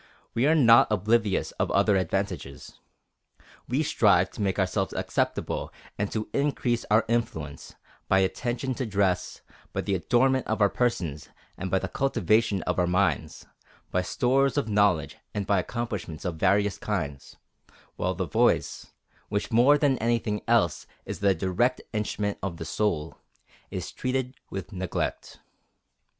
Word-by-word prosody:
We 125 +5 +2
are 160 - +4
not 115 -7 +6
oblivious 105 -1 +1
of - - +1
other 100 +1 +3
advantages. 80 -6 -3 0.9
We 135 +6 +1
strive 100 - +3
to - - -7
make 95 -2 0
ourselves 95 0 0
acceptable - - -2 0.2
and 100 0 -2
to 110 -1 -3
increase 135 -4 0
our 105 +1 +4
influence, 80 -11 -3 0.3
by 95 0 +4
attention 120 +7 -1
to 125 0 -3
dress, 95 -3 0 0.3
by - - -1
the 100 - -2
adornment 125 +8 +2
of 110 0 -1
our 100 -1 +4
persons, 85 - -1 0.3
and 95 - -5
by 95 - +2
the - - -2
cultivation 110 -5 +1
of 90 - -1
our 90 - +2
minds, 90 -4 0 0.5
by 90 - +1
stores 135 +8 +1
of 140 - +1
knowledge 100 -7 +2 0.2
and 100 -1 -1
by 100 0 +2
accomplishments 105 -7 -4
of 85 -3 -2
various 100 +3 +2
kinds, 75 -10 -4 0.6
while - - -1
the - - -2
voice, - - +1 0.4
which 100 0 -2
more 125 +6 +6
than 140 -3 +2
anything 115 -2 0
else 115 -9 +2 0.2
is - - -5
the 100 -1 +3
direct 95 +9 +1
instrument 105 -1 -2
of 90 -4 -4
the 80 - -6
soul, 80 -6 -2 0.5
is - - -5
treated 130 0 -2 0.2
with 95 +2 -6
neglect. 95 -2 -3
105 Hz, 145 wpm, -27 LUFS, 95-120 Hz, 0.9 s, not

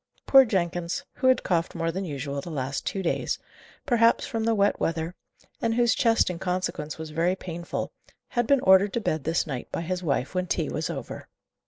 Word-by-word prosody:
Poor 270 -1 +8
Jenkins, 175 -4 -1
who 260 - +1
had 260 -1 +4
coughed 170 -2 0
more 165 0 -1
than 190 +3 -3
usual 140 -2 -4
the 170 - -8
last 135 -3 -3
two 195 - -2
days, 170 - 0 0.5
perhaps 230 -2 +3
from 225 -5 -2
the 225 0 +2
wet 200 0 +2
weather, 165 +1 -1 0.5
and 230 -2 +1
whose 240 -1 +4
chest 230 -4 +3
in 180 -2 -3
consequence 180 -5 -2
was 160 -1 -7
very 170 +4 +1
painful, 175 -2 -5 0.4
had 240 -2 0
been 280 -2 +4
ordered 190 +1 +5
to - - +1
bed 155 -9 -2
this 160 +1 +1
night 135 -5 -5
by - - -2
his 180 +2 -3
wife 140 -4 -1
when 185 0 -1
tea - - -1
was - - -2
over. - - -6
180 Hz, 200 wpm, -26 LUFS, 160-225 Hz, 0.5 s, Poor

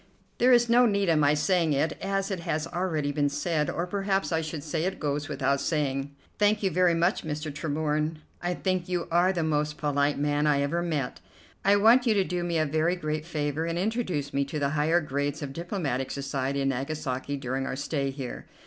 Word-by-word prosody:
"There 250 +2 +5
is 240 -1 +5
no 240 +1 +5
need 200 -3 +1
of 160 -2 +4
my 145 0 +4
saying 165 0 +2
it, 145 +3 0
as 195 +1 -1
it 190 - -2
has 160 -2 -2
already 165 -5 -1
been 145 0 +1
said; 150 0 -1
or 170 - -2
perhaps 195 +1 -1
I 160 -1 +1
should 155 -2 -5
say 160 +2 -2
'it 190 +1 -2
goes 145 -1 -2
without 140 -1 0
saying.'" 140 -3 -1 0.3
"Thank 210 0 +3
you 190 - +2
very 180 0 +3
much, 175 +4 +1
Mr. 150 -1 -4
Tremorne; 155 +1 -1 0.2
I 175 0 -1
think 185 -2 -1
you 175 -1 -1
are 175 +2 +4
the 175 -3 -1
most 150 -1 0
polite 145 0 +1
man 145 +1 +1
I 140 -1 +3
ever 165 +5 0
met. 155 -7 -2 0.4
I 200 +1 +5
want 230 +5 +5
you 220 - +4
to 195 - +3
do 180 -1 -2
me 170 -1 -1
a 155 - +2
very 160 +4 +1
great 155 -2 -3
favor 150 -1 -2
and 165 0 -2
introduce 185 - -1
me 140 - +2
to 145 +3 -5
the 140 -1 +1
higher 155 +4 +2
grades 145 0 -2
of 135 -1 -5
diplomatic 155 - -2
society 140 0 -2
in 135 - +1
Nagasaki 135 0 -3
during 135 0 -3
our - - -3
stay 140 0 -2
here." 135 -2 -6
155 Hz, 210 wpm, -27 LUFS, 145-180 Hz, 0.4 s, There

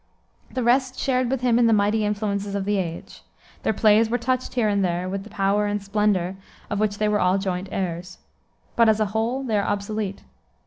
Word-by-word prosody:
The 255 - -3
rest 255 +2 +2
shared 255 -2 0
with 265 -1 -1
him 240 -2 +3
in 235 - +5
the 225 - +4
mighty 210 +2 +2
influences 205 -1 -2
of 200 -1 -2
the 205 0 +1
age. 170 -3 -5 0.4
Their - - +1
plays 220 +1 +4
are 245 - +2
touched 255 +1 -2
here 235 -4 +2
and 200 -1 +1
there 180 0 -1
with 195 +1 -4
the 215 - -12
power 205 0 +1
and 205 0 -1
splendor 200 -2 0 0.3
of 205 - -1
which 210 -1 0
they 215 - +1
were 210 0 +1
all 180 0 +3
joint 190 -1 -3
heirs. 180 -1 -4 0.6
But, 230 -1 +5
as 215 0 +3
a 215 - +2
whole, 235 +5 -1
they 220 -5 0
are - - 0
obsolete. 205 -1 -3
210 Hz, 215 wpm, -23 LUFS, 195-225 Hz, 0.6 s, in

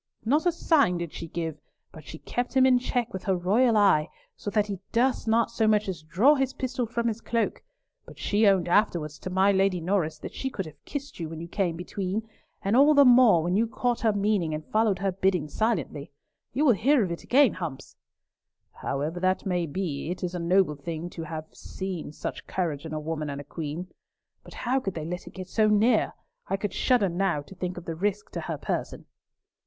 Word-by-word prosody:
Not 295 +9 +2
a - - +5
sign 290 - +2
did 170 -2 -5
she 165 - -6
give, 160 -2 -4 0.3
but 155 -2 -13
she 160 - -8
kept 245 +10 -4
him 260 - +6
in 255 -1 +5
check 245 -1 -2
with 190 - -6
her 190 - +2
royal 220 +6 +3
eye, 185 -6 +4 0.3
so - - -5
that 210 0 +2
he 200 -3 -5
durst 245 +1 +1
not 230 +1 +2
so 225 -1 +1
much 210 -1 +3
as 180 -5 -4
draw 190 - +4
his 270 -2 0
pistol 250 -2 -2
from 235 +1 -1
his 230 0 -2
cloak; 230 -1 -1 0.5
but - - -13
she 210 +1 +2
owned 190 -3 +3
afterwards 170 -6 +1
to - - -6
my 190 +2 +3
Lady 195 -2 +2
Norris 165 -3 0
that - - -8
she 265 - -3
could 195 -7 -4
have 150 -2 -13
kissed 285 -5 -6
you 165 -2 -4
when 160 0 -7
you 170 - -6
came 175 -2 -1
between, 190 +5 -4 0.4
and 200 +2 +1
all 290 +4 +6
the 285 -1 +7
more, 240 -9 +6
when 175 +2 0
you 225 +3 +2
caught 240 +1 -1
her 225 - +2
meaning 200 -6 0
and 155 0 -6
followed 215 -3 +2
her 195 +1 0
bidding 185 -4 0
silently. 160 - -2 0.4
You 285 +5 +1
will 255 - +6
hear 250 +4 +3
of 180 - -2
it 170 - -5
again, 270 -2 +4
Humps." 155 -7 -6 0.8
"However 150 +5 -3
that 185 +1 0
may 180 -3 0
be, 155 -2 -3
it 180 +1 -4
is 180 0 -2
a 180 - -3
noble 175 -1 +3
thing 165 +4 -6
to 165 - -7
have 155 0 -5
seen 185 -5 -6
such - - -6
courage 165 -4 -2
in 155 - -7
a - - -2
woman 155 -1 -3
and 140 0 -5
a - - -7
queen. 160 +4 -5 0.6
But - - -13
how 255 +2 0
could 195 -7 -4
they 160 -2 -4
let 180 +2 -5
it - - -11
go 190 - -5
so 215 +4 +1
near? 215 +2 +3 0.3
I 195 - 0
could 200 -1 -3
shudder 245 -6 +3
now 175 -4 0
to 145 - -13
think 180 -1 -4
of 180 - -8
the 165 - -3
risk 205 +4 -2
to - - -4
her - - -4
person!" - - -4
190 Hz, 220 wpm, -27 LUFS, 170-225 Hz, 0.8 s, the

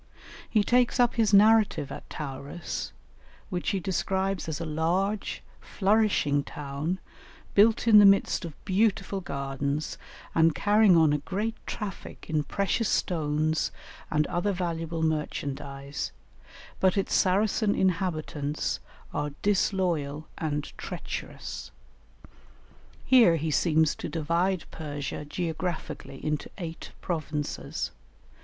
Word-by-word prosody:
He 215 -2 +3
takes 245 +2 +3
up 245 -1 +4
his 225 -3 +2
narrative 210 -8 +5
at - - -8
Tauris, 145 +2 -5 0.6
which 180 -1 -1
he 195 - 0
describes 190 0 -1
as 150 - -3
a 165 - -3
large 175 +7 -1 0.2
flourishing 195 -9 +2
town 150 +5 -4 0.6
built 220 +3 +4
in 215 -2 +9
the 205 - +8
midst 195 -1 +3
of 165 -3 -6
beautiful 195 -1 +1
gardens 140 0 -3 0.3
and 165 -1 +4
carrying 205 -3 +5
on 160 -2 +5
a 150 - +1
great 205 +9 -2
traffic 205 -3 -6
in 155 -1 0
precious 200 - 0
stones 155 -2 0 0.4
and 150 0 +2
other 180 +4 0
valuable 165 -3 -2
merchandise, 140 -3 -3 0.7
but 190 +1 +3
its 195 - 0
Saracen 205 +2 +2
inhabitants 155 -5 -1 0.3
are 145 0 -2
disloyal 175 -7 0
and 150 -2 -3
treacherous. - - -6 1.4
Here 235 -10 +6
he 160 0 -1
seems 160 0 +3
to - - -5
divide 170 +3 0
Persia 145 -1 -5
geographically 165 -3 -4
into 150 -1 -1
eight 165 -4 -6
provinces. 155 -4 -3
170 Hz, 110 wpm, -28 LUFS, 150-195 Hz, 1.4 s, in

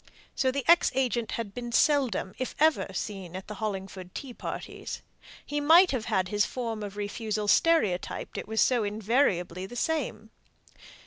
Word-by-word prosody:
So 260 - +1
the 265 0 -2
ex 340 0 +6
agent 245 -3 0
had 220 -4 -4
been 240 +1 -5
seldom, 255 -8 +2
if 255 - -3
ever, 315 +1 +3
seen 190 -2 -5
at 190 - -7
the 210 - -6
Hollingford 190 -3 -5
tea 265 -3 -6
parties. - - -6 0.4
He 295 0 -2
might 335 +5 +7
have 250 -5 -2
had 185 -1 0
his 210 +1 +2
form 230 -3 -3
of 205 -1 -6
refusal 210 0 -3
stereotyped, 215 - +2
it - - -5
was 220 0 +1
so 245 -4 +3
invariably 205 -4 0
the 245 - -10
same. 260 -6 -2
220 Hz, 165 wpm, -28 LUFS, 200-265 Hz, 0.4 s, might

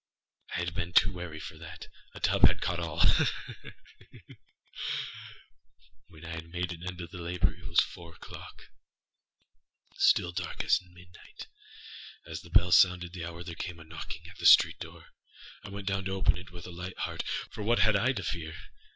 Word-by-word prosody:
I - - 0
had 90 0 -2
been 90 -1 -3
too 100 - +5
wary 85 -3 -6
for 80 - -8
that. 80 -1 -9 0.3
A - - -7
tub - - +6
had - - 0
caught 85 -1 -1
allâha! 80 -1 0
ha! - - +4 2.8
When 80 +1 -13
I - - -7
had 80 0 -6
made 90 +1 -2
an 85 - -11
end 90 -1 -5
of 85 0 -8
these 90 - -7
labors, 85 +1 0
it - - -8
was - - +5
four 85 -1 -7
oâclockâstill 85 0 -4
dark 90 0 -3
as - - +4
midnight. 90 0 -13 0.8
As 80 -1 -6
the 85 - -14
bell 85 +1 +4
sounded 90 0 +5
the 85 -3 -5
hour, 85 0 -7
there 85 -1 -6
came 85 0 -5
a - - -10
knocking 80 +1 -8
at 90 - -13
the - - +4
street - - +8
door. - - -10 0.5
I 105 - -8
went 100 0 -7
down 100 -1 0
to 95 - -2
open 95 - +2
it 90 -1 -9
with 90 -1 -10
a 90 - -8
light 90 +2 -7
heart, - - -2 0.3
âfor 110 -2 -5
what 120 +3 +3
had 105 +1 +5
I 100 - +3
now 130 - +3
to 100 -6 -4
fear? 80 -3 -4
85 Hz, 190 wpm, -30 LUFS, 85-90 Hz, 2.8 s, street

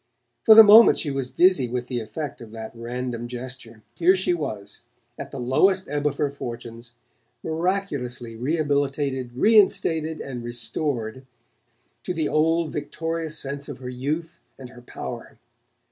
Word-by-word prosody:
For 220 - +7
the 225 - +12
moment 220 +2 +8
she 145 - -2
was 135 -2 -3
dizzy 175 -8 +3
with 125 0 -3
the 125 -1 -3
effect 120 +5 -6
of 115 - -10
that 110 -1 -7
random 120 0 -5
gesture. 120 -2 -9
Here 180 +3 +4
she 185 -1 0
was, 110 -11 -5 0.3
at - - -8
the 135 - -7
lowest 185 +10 +2
ebb 145 +1 -1
of 145 -1 -2
her 145 -2 0
fortunes, 120 -3 -8 0.5
miraculously 160 -9 -3
rehabilitated, 140 -1 -1
reinstated, 160 - +3
and 125 -3 -6
restored 120 0 -3 0.7
to 180 - -4
the 160 -2 0
old 165 +1 +1
victorious 160 +1 -4
sense 140 +1 -5
of 140 - -7
her 125 -1 -7
youth 150 +7 -4 0.2
and 130 -2 -11
her 125 -1 -14
power! 120 - -8
140 Hz, 145 wpm, -24 LUFS, 120-160 Hz, 0.7 s, the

